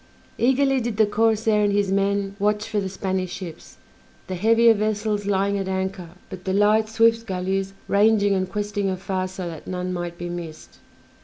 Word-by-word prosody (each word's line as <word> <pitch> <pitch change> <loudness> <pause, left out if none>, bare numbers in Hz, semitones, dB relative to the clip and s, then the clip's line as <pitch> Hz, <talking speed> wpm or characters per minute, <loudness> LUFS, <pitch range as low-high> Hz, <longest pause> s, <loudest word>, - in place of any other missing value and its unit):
Eagerly 270 +2 +3
did 235 -3 -3
the 220 - +5
corsair 220 0 +2
and 205 - +2
his 200 -1 +1
men 200 0 0
watch 210 +1 0
for 220 -2 -1
the 195 -1 -3
Spanish 185 -1 -3
ships, 170 -4 -9 0.5
the 185 - -5
heavier 225 +5 +5
vessels 210 -1 -1
lying 200 0 +1
at 195 - -3
anchor, 190 -2 -3 0.2
but 185 -1 -9
the 190 - -2
light, 210 +2 +3
swift 230 0 +3
galleys 190 +1 -2
ranging 205 0 +3
and 185 -1 -1
questing 205 -1 -2
afar 185 0 -2
so 185 -1 -6
that 165 -2 -8
none 180 0 -3
might 175 -1 -4
be 175 - -5
missed. 170 -3 -8
200 Hz, 175 wpm, -23 LUFS, 185-215 Hz, 0.5 s, the